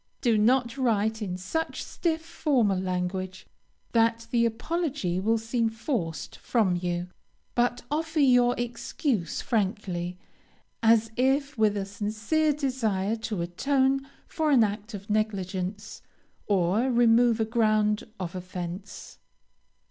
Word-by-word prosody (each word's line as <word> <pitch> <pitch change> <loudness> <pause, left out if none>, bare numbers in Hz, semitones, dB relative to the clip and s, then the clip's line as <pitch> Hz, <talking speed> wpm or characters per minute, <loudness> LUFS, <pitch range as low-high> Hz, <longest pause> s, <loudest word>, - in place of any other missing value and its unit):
Do 235 -4 +3
not 240 +4 +2
write 220 -3 +1
in 185 -3 -3
such 320 - -3
stiff, 325 -2 -2
formal 250 - +1
language 185 0 -3 0.5
that 230 0 +2
the 235 -1 +3
apology 250 - -2
will 225 +4 +2
seem 225 +1 0
forced 220 - -3
from 210 -7 +1
you, 175 0 -2 0.4
but 245 0 +1
offer 320 +1 -1
your 245 -3 +5
excuse 235 - -2
frankly, 185 -5 -1 0.6
as 225 -1 +4
if 275 +3 +1
with 215 -3 +2
a 195 - -2
sincere 215 +10 0
desire 230 -8 0
to 215 -5 -3
atone 265 +9 +1 0.2
for 315 -3 -1
an 260 -6 +6
act 210 +1 -3
of 200 0 -9
negligence, 205 -1 -2 0.5
or 200 +5 +2
remove 235 -1 +4
a 220 - +2
ground 215 -2 +2
of 175 -2 -4
offence. 180 +1 -7
220 Hz, 120 wpm, -27 LUFS, 190-245 Hz, 0.6 s, an